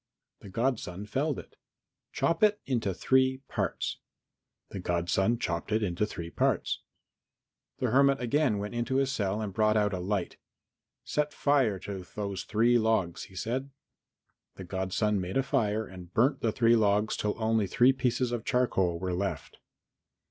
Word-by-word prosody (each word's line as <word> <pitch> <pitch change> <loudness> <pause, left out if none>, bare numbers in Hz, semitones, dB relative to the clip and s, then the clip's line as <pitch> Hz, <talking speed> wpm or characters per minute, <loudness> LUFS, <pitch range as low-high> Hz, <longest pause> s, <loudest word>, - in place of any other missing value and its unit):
The 100 - -11
godson 105 -4 -2
felled 140 +6 -1
it. - - -11 0.5
"Chop 165 0 0
it 210 -1 +4
into 115 -7 0
three 130 +6 +2
parts." - - -2 0.7
The 100 - -6
godson 90 +6 +1
chopped 85 -3 -3
it 110 +1 +2
into 95 +2 0
three 85 -5 -7
parts. - - 0 1.0
The 125 -3 -1
hermit 140 +1 +4
again 125 -1 +1
went 105 +2 -4
into 120 +2 -1
his 135 0 +2
cell 105 -3 -1
and 105 -3 -4
brought 110 +1 +3
out 105 -1 +2
a 95 - -2
light. 95 0 -2 0.7
"Set 150 0 -1
fire 135 -8 +2
to 95 -2 -6
those 100 -3 -3
three 120 +3 +3
logs," 110 -6 0
he 95 - -17
said. 130 +8 -3 0.9
The 95 - -8
godson 95 +2 -1
made 90 +5 -3
a 135 - +3
fire 110 -6 0
and 90 -2 -11
burnt 135 +7 +2
the 115 - +1
three 115 +1 +4
logs 105 -1 +2
till 105 0 -1
only 110 -2 +1
three 125 +7 +4
pieces 125 -1 0
of 120 -2 -2
charcoal 95 -10 +1
were 90 +1 -3
left. 90 -6 -4
110 Hz, 160 wpm, -29 LUFS, 95-125 Hz, 1.0 s, it